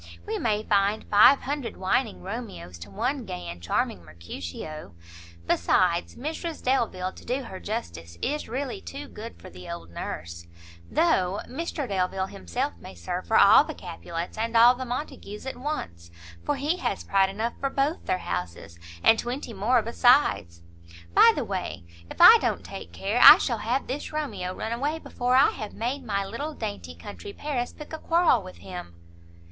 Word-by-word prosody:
we - - -3
may 215 -2 0
find 205 +1 +1
five 215 +7 +7
hundred 280 -3 -4
whining 210 +4 0
Romeos 190 - -7
to 85 - -10
one 265 - -2
gay 90 - -6
and 85 0 -7
charming 85 0 -1
Mercutio. 85 - -8 0.5
Besides, 170 - +2
Mrs 315 +5 -5
Delvile, 220 -8 0
to - - -14
do 260 +3 -2
her 190 -6 -8
justice, 85 - -6
is 300 -2 -2
really 270 - -4
too 285 +1 -8
good 225 +2 -10
for - - -12
the 90 +1 -11
old 85 0 -7
Nurse, 85 0 -6 0.4
though 195 - +2
Mr 295 0 -4
Delvile 190 -1 -1
himself 90 - -3
may 95 - -11
serve 85 -1 -5
for - - +3
all - - +8
the - - -7
Capulets 165 - -6
and 230 +1 0
all 240 +2 +8
the 260 +1 -6
Montagues 250 -4 -6
at 265 - -4
once, 85 - -5 0.3
for 290 - 0
he 295 +6 -1
has 200 - -2
pride 195 -1 +3
enough 220 +4 -2
for 275 - 0
both 280 +5 -1
their 185 - +1
houses, 85 -1 -5 0.2
and 225 - +6
twenty 245 0 -4
more 225 +4 +2
besides. 230 - +3 0.5
By - - +8
the - - -2
way, 85 - -4 0.3
if - - -10
I 440 +7 +10
don't - - -1
take - - -8
care, - - -1
I - - +12
shall 235 -4 -1
have 245 +6 -1
this 275 +3 -5
Romeo 205 -13 -3
run 220 - -4
away 285 +7 -1
before 250 -5 -1
I 270 +2 +6
have 215 -5 -7
made 255 +4 -3
my 200 -4 -1
little 285 +10 -5
dainty 85 -5 -6
country 85 - -9
Paris 270 -5 -3
pick 300 +1 -11
a 315 - -4
quarrel 330 -9 +3
with 185 -1 -11
him." 175 - -9
220 Hz, 175 wpm, -26 LUFS, -, 0.5 s, I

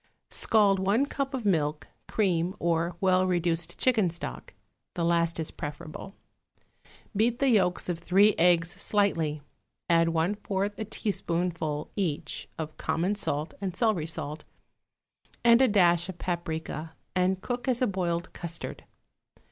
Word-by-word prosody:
= - - -51
Scald 205 -3 +4
one 200 +8 +2
cup 275 -1 -3
of 245 -4 -5
milk, 155 -6 0 0.2
cream 180 -3 0
or 170 0 0
well 185 -1 +3
reduced 175 -2 0
chicken 225 -8 +3
stock 170 +1 -6 0.4
(the 170 -2 0
last 170 0 +2
is 160 - -2
preferable); 155 +6 -7 1.0
beat 230 +3 +2
the 275 +1 +2
yolks 185 -6 +2
of 175 -2 -2
three 195 +5 +4
eggs 170 0 +4
slightly, 175 -7 0 0.5
add 165 0 +4
one 165 +4 +1
fourth 200 0 -2
a 220 - -2
teaspoonful, 170 -7 -2
each, 175 -8 -2
of 155 -1 -6
common 165 +5 0
salt 155 -6 -2
and 190 -3 -3
celery 185 -7 +1
salt, 150 -1 -5 1.0
and 235 +1 +6
a 265 - +6
dash 175 -4 +3
of 185 - -6
paprica, 160 -2 -4 0.2
and 185 +1 +1
cook 245 +1 -3
as 250 -2 +2
a 255 - +3
boiled 175 -5 -2
custard. 170 -1 -5
180 Hz, 140 wpm, -28 LUFS, 165-205 Hz, 1.0 s, and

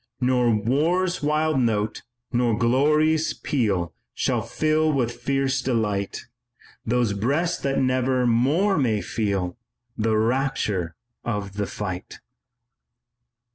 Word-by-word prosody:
"Nor 125 -2 +3
war's 160 - +1
wild 150 0 +1
note, 110 -3 0 0.3
nor 120 -3 +2
glory's 150 +6 +2
peal 100 - -1 0.2
Shall - - 0
fill 155 0 +1
with 125 -5 0
fierce 135 +2 -1
delight 105 -6 -1 0.6
Those 120 -2 +1
breasts 145 - 0
that 135 0 0
never 130 -1 +1
more 145 - +2
may 110 -6 +1
feel 100 -2 -2 0.4
The 110 -1 +1
rapture 110 -7 0 0.3
of 105 -4 -3
the 100 0 -2
fight." 95 -4 -5
125 Hz, 105 wpm, -24 LUFS, 110-140 Hz, 0.6 s, Nor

